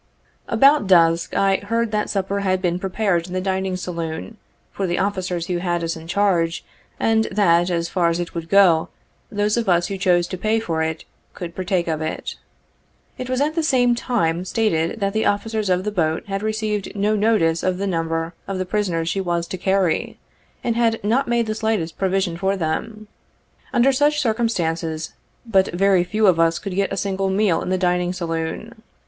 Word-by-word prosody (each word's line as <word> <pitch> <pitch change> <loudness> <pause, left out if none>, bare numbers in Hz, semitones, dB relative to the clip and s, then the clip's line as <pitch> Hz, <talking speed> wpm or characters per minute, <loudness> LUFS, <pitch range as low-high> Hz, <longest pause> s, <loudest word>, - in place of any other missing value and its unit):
About 275 -5 +4
dusk 165 -2 +4
I 195 -1 +3
heard 230 +2 -1
that 210 -1 -1
supper 195 0 -1
had 185 -2 +1
been 180 -1 -1
prepared 190 -2 0
in 180 - -8
the 185 - 0
dining 190 0 -1
saloon, 170 +3 -5 0.3
for 195 - -2
the 175 - -1
officers 185 -4 -1
who 180 0 -2
had 175 -1 -1
us 165 0 -2
in 160 0 -10
charge, 175 -3 +1 0.3
and 220 0 +2
that, 175 -3 +2
as 170 -1 -1
far 170 -1 +1
as 170 +1 -1
it 175 - -4
would 165 -1 -5
go, 185 -5 +5 0.4
those 210 +1 0
of 230 -4 0
us 175 -1 +2
who 195 -1 -4
chose 175 -2 +3
to 185 - -5
pay 220 +3 +1
for 165 -7 -2
it, 160 0 -3 0.3
could 170 -2 -6
partake 185 -1 -1
of 160 -1 -1
it. 155 - -4 0.9
It 255 0 -5
was 255 +1 0
at 300 +2 +1
the 330 - 0
same 250 -5 +3
time 180 -9 0
stated, 185 -3 0
that 195 0 0
the 220 0 +1
officers 215 0 -1
of 180 0 +2
the 210 - -2
boat 160 -3 0
had 195 -1 -3
received 215 -2 -2
no 205 +2 +1
notice 205 -7 +2
of 185 -1 0
the 200 - -2
number 165 -2 -2
of 195 - -3
the 185 - -2
prisoners 180 -4 -1
she 195 +3 0
was 170 -2 -1
to - - -3
carry, 190 -3 0 0.5
and 235 - 0
had 230 -1 +2
not 240 +7 +1
made 235 -1 +1
the 215 - -2
slightest 215 -7 -2
provision 190 -2 0
for 195 +2 0
them. 210 +6 -3 0.6
Under 250 +3 +4
such 290 +2 +2
circumstances, 170 - -1 0.3
but 195 -5 +3
very 190 0 +3
few 215 +4 0
of 180 -4 +4
us 165 0 +3
could 195 - -5
get 195 +1 0
a - - -3
single 195 -1 -1
meal 190 -3 +2
in - - -4
the 185 - +1
dining 180 -1 +1
saloon. 170 +6 -4
190 Hz, 195 wpm, -21 LUFS, 170-215 Hz, 0.9 s, go